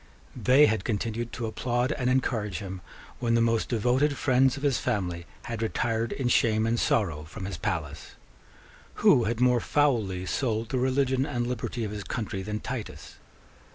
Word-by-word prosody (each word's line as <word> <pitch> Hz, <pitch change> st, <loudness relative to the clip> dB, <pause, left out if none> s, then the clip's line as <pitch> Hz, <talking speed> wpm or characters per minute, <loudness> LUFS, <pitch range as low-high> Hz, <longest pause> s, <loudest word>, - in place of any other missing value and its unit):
They 130 Hz, +5 st, +5 dB
had 110 Hz, -5 st, 0 dB
continued 115 Hz, +2 st, -2 dB
to 120 Hz, -, -3 dB
applaud 120 Hz, +3 st, -1 dB
and 125 Hz, -4 st, 0 dB
encourage 115 Hz, -6 st, 0 dB
him 95 Hz, -2 st, -6 dB, 0.4 s
when 115 Hz, -2 st, +1 dB
the -, -, +4 dB
most 115 Hz, -1 st, +1 dB
devoted 125 Hz, +5 st, +1 dB
friends 130 Hz, 0 st, +3 dB
of 140 Hz, -, -8 dB
his 140 Hz, -3 st, +2 dB
family 90 Hz, -8 st, -2 dB, 0.2 s
had 115 Hz, -2 st, -5 dB
retired 115 Hz, 0 st, -1 dB
in 135 Hz, -3 st, -2 dB
shame 110 Hz, -2 st, +3 dB
and 115 Hz, +1 st, +1 dB
sorrow 85 Hz, -9 st, +1 dB
from 95 Hz, +5 st, -8 dB
his 95 Hz, -3 st, -5 dB
palace. 80 Hz, -5 st, -4 dB, 0.9 s
Who 120 Hz, -, +6 dB
had 115 Hz, +1 st, -1 dB
more 125 Hz, -1 st, +4 dB
foully 110 Hz, -10 st, +1 dB
sold 115 Hz, +1 st, -1 dB
the 130 Hz, -, 0 dB
religion 130 Hz, 0 st, +1 dB
and 120 Hz, -4 st, -2 dB
liberty 120 Hz, -1 st, -3 dB
of 105 Hz, -, -3 dB
his 105 Hz, -1 st, -5 dB
country 100 Hz, -4 st, -4 dB
than 105 Hz, +2 st, -4 dB
Titus? 125 Hz, -4 st, -7 dB
115 Hz, 170 wpm, -27 LUFS, 105-125 Hz, 0.9 s, Who